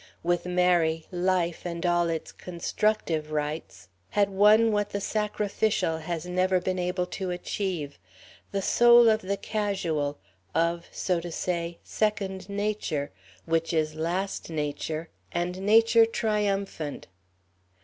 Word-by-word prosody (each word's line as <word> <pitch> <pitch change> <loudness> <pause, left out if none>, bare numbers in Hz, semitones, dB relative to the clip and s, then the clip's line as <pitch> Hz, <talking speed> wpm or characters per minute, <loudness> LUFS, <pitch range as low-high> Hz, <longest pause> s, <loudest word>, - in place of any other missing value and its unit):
With 175 +1 0
Mary, 175 -3 +2
life 180 -1 0
and 170 0 -4
all 175 -1 +2
its 165 -1 -3
constructive 170 -3 -1
rites 150 - -4 0.2
had 200 -1 +2
won 210 +3 +5
what 205 -1 0
the 200 - -3
sacrificial 210 -4 0
has 165 +1 -4
never 185 +1 +2
been 185 +1 -2
able 180 0 -1
to 185 +1 -4
achieve 175 -4 -3 0.5
the 195 -1 -1
soul 240 +1 +7
of 215 0 +2
the 200 +1 -2
casual, 175 -11 -1 0.4
of, 170 +1 +1
so 180 -2 0
to 170 0 -6
say, 170 0 -2
second 195 -3 -2
nature, 200 -8 -2 0.3
which 165 +1 0
is 155 -1 +1
last 175 +6 -2
nature, 155 +1 -3 0.2
and 180 +2 -2
nature 225 +2 +5
triumphant. 200 -8 -1
180 Hz, 125 wpm, -27 LUFS, 165-205 Hz, 0.5 s, soul